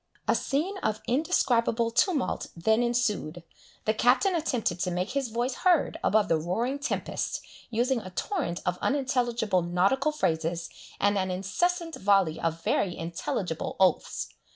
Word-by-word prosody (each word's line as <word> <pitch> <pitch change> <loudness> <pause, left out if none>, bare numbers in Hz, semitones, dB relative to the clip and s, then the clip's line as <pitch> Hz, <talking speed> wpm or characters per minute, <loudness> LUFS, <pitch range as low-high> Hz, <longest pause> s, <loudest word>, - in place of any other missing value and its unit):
A - - +4
scene 345 +9 -1
of 215 - -1
indescribable 240 -5 +2
tumult 275 +5 +1
then 220 +7 +2
ensued. 230 -9 -1 0.4
The 215 - +2
Captain 255 - +3
attempted 245 - -1
to 180 - 0
make 180 +4 -2
his 275 -1 -1
voice 240 +3 -1
heard 350 +2 +2
above 210 0 +3
the 165 - +3
roaring 230 - -1
tempest, 290 - -2 0.3
using 245 +2 +1
a 185 - -8
torrent 190 - -2
of 180 0 -1
unintelligible 240 -8 +1
nautical 195 - +2
phrases, 165 - -1 0.3
and 205 0 +2
an 185 0 -1
incessant 330 - -1
volley 195 -5 +3
of 165 0 -2
very 180 -3 0
intelligible 170 0 -3
oaths. 190 -1 +1
225 Hz, 140 wpm, -28 LUFS, 180-265 Hz, 0.4 s, A